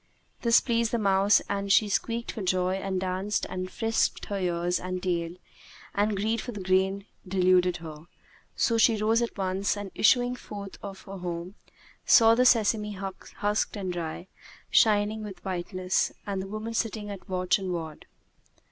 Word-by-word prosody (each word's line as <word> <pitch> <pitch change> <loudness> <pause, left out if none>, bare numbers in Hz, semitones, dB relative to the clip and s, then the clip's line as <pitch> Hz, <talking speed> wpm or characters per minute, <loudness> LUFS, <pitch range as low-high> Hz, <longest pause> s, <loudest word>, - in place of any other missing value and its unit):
This 235 0 +5
pleased 230 -2 0
the 235 - +1
mouse 200 -1 +3
and 200 0 -2
she 210 +2 +5
squeaked 230 +3 -1
for 220 - -6
joy 185 0 +1
and 190 -1 -2
danced 190 +2 -1
and 185 0 -4
frisked 225 +2 0
her 200 -1 -3
ears 175 -1 0
and 185 0 -5
tail, 170 -2 -1 0.6
and 205 0 +1
greed 220 +3 0
for 245 - -6
the 205 - -6
grain 190 +1 +1 0.2
deluded 180 -1 +3
her; 160 -1 -10 0.5
so 230 -1 +2
she 225 0 +5
rose 220 +2 +2
at 235 - -3
once 195 +1 -1
and 205 -2 -6
issuing 245 +2 +3
forth 200 -5 -9
of 195 -1 -8
her 195 0 -8
home, 175 +1 -5 0.5
saw 225 -1 +7
the 250 +2 +3
sesame 215 -3 +3
husked 200 +2 -3
and 185 -3 -3
dry, 170 0 -5 0.5
shining 215 0 +3
with 200 -3 -9
whiteness, 185 0 -1
and 195 -2 -2
the 190 - -6
woman 215 +3 -5
sitting 215 -2 -2
at 200 0 -10
watch 185 +1 +1
and 190 -1 -4
ward. 160 -3 -6
195 Hz, 165 wpm, -27 LUFS, 185-215 Hz, 0.6 s, saw